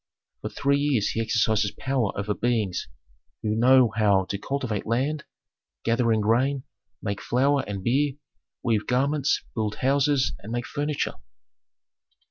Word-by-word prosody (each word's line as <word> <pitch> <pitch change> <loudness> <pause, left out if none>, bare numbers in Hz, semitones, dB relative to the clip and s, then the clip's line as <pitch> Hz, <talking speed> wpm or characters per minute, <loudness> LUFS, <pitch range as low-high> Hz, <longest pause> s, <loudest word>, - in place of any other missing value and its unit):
For - - -4
three 140 0 +1
years 140 -8 +1
he 115 - -1
exercises 110 -2 +1
power 130 -6 0
over 105 +1 -1
beings 110 -6 -1 0.6
who 105 - 0
know 125 +1 +5
how 100 -3 +3
to 100 - -1
cultivate 125 -5 -3
land, 135 +6 0 0.6
gather 115 0 +2
in 110 -1 +2
grain, 130 +5 +1 0.4
make 100 -2 -3
flour 135 +3 +2
and 100 -2 -5
beer, 135 +5 +2 0.5
weave 110 -3 0
garments, 140 +3 +1
build 110 -2 -2
houses, 135 0 +2
and 105 - -9
make 120 0 -2
furniture. 145 0 -2
120 Hz, 135 wpm, -25 LUFS, 110-140 Hz, 0.6 s, know